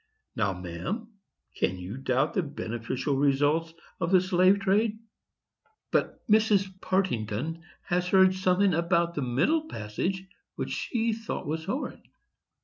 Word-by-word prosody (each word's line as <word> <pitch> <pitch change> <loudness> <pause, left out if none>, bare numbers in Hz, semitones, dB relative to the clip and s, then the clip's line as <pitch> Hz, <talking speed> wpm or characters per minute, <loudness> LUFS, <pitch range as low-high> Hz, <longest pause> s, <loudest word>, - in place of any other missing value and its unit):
Now, 100 -4 +1
ma'am, 90 - -5 0.5
can 95 - 0
you 90 +4 -6
doubt 135 +2 0
the 190 - +2
beneficial 130 -1 -3
results 145 +4 +2 0.3
of 165 - 0
the 185 - +7
slave 185 +2 +3
trade?" 210 +3 +2 0.9
But - - -1
Mrs 205 -3 +3
Partington 160 - -1 0.2
has 180 0 0
heard 190 0 +5
something 185 +1 +2
about 170 +1 +1
that 150 - -2
middle 220 - +1
passage 185 - -3 0.3
which - - -4
she 230 -2 -1
thought 225 0 -5
was 160 +2 -3
horrid. 255 - -3
170 Hz, 130 wpm, -28 LUFS, 135-195 Hz, 0.9 s, the